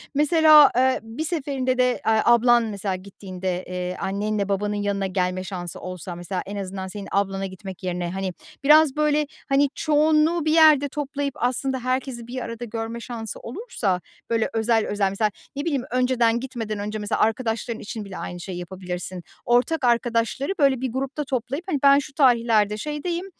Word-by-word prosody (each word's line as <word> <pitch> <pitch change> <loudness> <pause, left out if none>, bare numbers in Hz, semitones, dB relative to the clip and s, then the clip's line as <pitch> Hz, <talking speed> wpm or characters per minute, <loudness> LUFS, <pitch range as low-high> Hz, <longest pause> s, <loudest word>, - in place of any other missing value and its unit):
mesela, 305 0 +7
eee, 260 0 +3
bir 225 +8 -5
seferinde 270 -6 -1
de, 250 0 +4 0.2
eee, 220 -1 +3
ablan 240 0 +5
mesela 200 -3 -3
gittiğinde, 185 -1 -5
eee, 180 0 -4
annenle 200 +1 -1
babanın 205 +1 0
yanına 200 -1 -1
gelme 185 0 -1
şansı 175 -2 -6
olsa, 180 -1 -7
mesela 180 +1 -4
en 200 +1 -6
azından 190 -1 -5
senin 200 +1 -7
ablana 195 -1 0
gitmek 190 -1 -9
yerine, 175 -1 -2
hani, 190 -1 -3 0.3
biraz 300 0 +6
böyle, 300 -1 +2 0.2
hani, 275 +1 +3
çoğunluğu 310 +1 +2
bir 310 - +2
yerde 305 -3 +6
toplayıp 285 -1 -3
aslında 260 +2 -1
herkesi 255 -1 -3
bir 255 +1 -5
arada 230 0 -5
görme 225 +1 -5
şansı 230 -2 -6
olursa, 230 - -3 0.3
böyle 225 -1 +1
özel 225 0 +2
özel. 205 -2 +1
Mesela 210 +2 0 0.2
ne 285 - -3
bileyim, 280 -6 0
önceden 245 -2 +2
gitmeden 230 -5 -5
önce 210 +1 -4
mesela 205 - -2
arkadaşların 225 0 0
için 215 0 -6
bile 195 - -8
aynı 175 - -6
şeyi 180 +1 -6
yapabilirsin. 180 0 -6 0.2
Ortak 255 +5 +2
arkadaşları 235 - +1
böyle 270 -3 +3
bir 260 - -2
grupta 270 +4 -3
toplayıp, 270 +5 -3
hani, 290 -6 0
ben 280 0 +7
şu 275 - -8
tarihlerde 230 -6 +3
şeydeyim, 320 - -3
230 Hz, 165 wpm, -23 LUFS, 195-275 Hz, 0.3 s, mesela